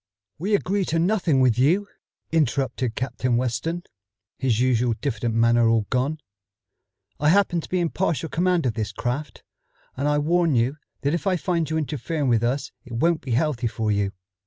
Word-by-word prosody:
"We 200 Hz, +5 st, +1 dB
agree 200 Hz, 0 st, 0 dB
to 165 Hz, -, -1 dB
nothing 170 Hz, -6 st, +2 dB
with 125 Hz, -2 st, +3 dB
you," 175 Hz, +10 st, +3 dB, 0.4 s
interrupted 130 Hz, -5 st, 0 dB
Captain 125 Hz, -1 st, -1 dB
Weston, 130 Hz, +8 st, -2 dB, 0.6 s
his 125 Hz, -4 st, +1 dB
usual 125 Hz, -2 st, +2 dB
diffident 120 Hz, -4 st, -2 dB
manner 115 Hz, 0 st, +4 dB
all 115 Hz, -2 st, +2 dB
gone. 135 Hz, +4 st, 0 dB, 1.0 s
"I 150 Hz, -, +3 dB
happen 175 Hz, -2 st, +3 dB
to -, -, -11 dB
be 185 Hz, -, 0 dB
in 170 Hz, -2 st, 0 dB
partial 165 Hz, -5 st, -1 dB
command 175 Hz, 0 st, +1 dB
of 120 Hz, -, +1 dB
this 110 Hz, -2 st, -3 dB
craft, 125 Hz, +7 st, -4 dB, 0.5 s
and 140 Hz, +3 st, -1 dB
I 150 Hz, 0 st, +2 dB
warn 165 Hz, 0 st, +2 dB
you 125 Hz, +5 st, +1 dB, 0.2 s
that 140 Hz, +2 st, 0 dB
if 170 Hz, +3 st, -2 dB
I 190 Hz, -, +3 dB
find 170 Hz, -3 st, -1 dB
you 160 Hz, -, 0 dB
interfering 150 Hz, -1 st, -2 dB
with 115 Hz, -2 st, +3 dB
us 135 Hz, +4 st, -1 dB
it 125 Hz, -, -11 dB
won't 165 Hz, +7 st, +1 dB
be 130 Hz, -3 st, -3 dB
healthy 130 Hz, -2 st, +1 dB
for 110 Hz, -1 st, -1 dB
you. 100 Hz, -1 st, 0 dB
140 Hz, 180 wpm, -24 LUFS, 120-165 Hz, 1.0 s, manner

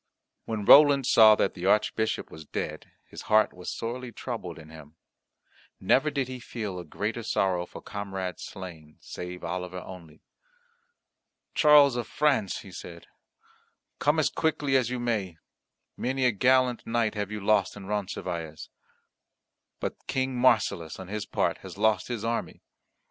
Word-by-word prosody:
When 110 Hz, -3 st, -3 dB
Roland 140 Hz, 0 st, +8 dB
saw 110 Hz, -3 st, +7 dB
that 100 Hz, -, 0 dB
the 90 Hz, 0 st, -4 dB
Archbishop 110 Hz, +2 st, +1 dB
was 80 Hz, -, -10 dB
dead, -, -, -5 dB, 0.2 s
his -, -, -10 dB
heart 110 Hz, 0 st, +4 dB
was 90 Hz, 0 st, -7 dB
sorely 120 Hz, +2 st, -5 dB
troubled 115 Hz, -9 st, -6 dB
in 80 Hz, -1 st, -13 dB
him. 80 Hz, -1 st, -13 dB, 0.8 s
Never 135 Hz, +10 st, +3 dB
did 140 Hz, -3 st, -2 dB
he 130 Hz, -1 st, -7 dB
feel 105 Hz, -6 st, -5 dB
a -, -, -6 dB
greater 105 Hz, +8 st, -4 dB
sorrow 95 Hz, -5 st, 0 dB
for -, -, -11 dB
comrade 95 Hz, -3 st, -5 dB
slain, 85 Hz, -6 st, -9 dB
save 90 Hz, 0 st, -8 dB
Oliver 90 Hz, 0 st, -4 dB
only. 85 Hz, -5 st, -12 dB, 1.3 s
"Charles 145 Hz, -4 st, +6 dB
of 120 Hz, -, -3 dB
France," 140 Hz, -10 st, +1 dB
he 95 Hz, -, -12 dB
said, 85 Hz, -1 st, -10 dB, 0.9 s
"come 150 Hz, +2 st, +2 dB
as 145 Hz, -2 st, +2 dB
quickly 150 Hz, -4 st, 0 dB
as 125 Hz, -3 st, +3 dB
you 125 Hz, 0 st, -3 dB
may, 105 Hz, -8 st, -2 dB, 0.6 s
many 130 Hz, +1 st, -1 dB
a 125 Hz, -, +5 dB
gallant 125 Hz, +3 st, +2 dB
knight 115 Hz, -1 st, +1 dB
have 105 Hz, -2 st, -3 dB
you 105 Hz, -, -4 dB
lost 105 Hz, +1 st, +1 dB
in 100 Hz, -, -9 dB
Roncesvalles. 90 Hz, -6 st, -4 dB, 1.1 s
But -, -, -5 dB
King 130 Hz, -1 st, -1 dB
Marsilas, 105 Hz, -9 st, +2 dB
on 95 Hz, -1 st, -9 dB
his 105 Hz, 0 st, -4 dB
part, -, -, 0 dB
has -, -, -10 dB
lost 110 Hz, -1 st, +2 dB
his 120 Hz, -3 st, -4 dB
army. 115 Hz, 0 st, -3 dB
105 Hz, 150 wpm, -27 LUFS, 90-125 Hz, 1.3 s, Roland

